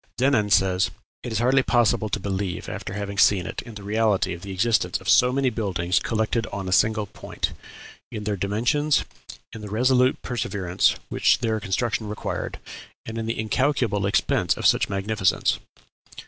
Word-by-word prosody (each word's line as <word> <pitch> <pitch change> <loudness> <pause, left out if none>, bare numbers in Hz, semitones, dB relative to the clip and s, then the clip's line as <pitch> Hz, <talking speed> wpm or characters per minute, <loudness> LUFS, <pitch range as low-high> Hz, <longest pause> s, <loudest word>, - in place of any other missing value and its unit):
Denon 125 -5 +2
says, 95 -2 +3 0.3
"It 120 - -6
is 110 - -1
hardly 130 +4 +3
possible 120 -3 +2
to 105 - -2
believe, 95 -2 -3
after - - -6
having 100 0 -4
seen 95 -5 +4
it, - - -5
in 115 -3 -11
the 105 - -9
reality 105 -2 +1
of 85 - -8
the 100 - -7
existence 110 +3 +1
of - - -12
so 125 0 +5
many 135 -1 +1
buildings 95 -5 0
collected 115 +1 -1
on 100 -2 -5
a - - -3
single 110 +2 +3
point - - -4 0.6
in 105 - -5
their 105 0 -1
dimensions, 120 +10 +1 0.5
in 115 - -8
the 105 - -7
resolute 125 +4 +2
perseverance 100 -7 0
which - - +3
their 110 -2 -1
construction 110 +2 -1
required, 105 0 -4 0.5
and 115 0 -5
in 115 - -4
the 115 - -2
incalculable 110 -3 0
expense 100 - +1
of - - -4
so - - +6
much - - -2
magnificence." 100 -1 0
105 Hz, 175 wpm, -24 LUFS, 100-120 Hz, 0.6 s, so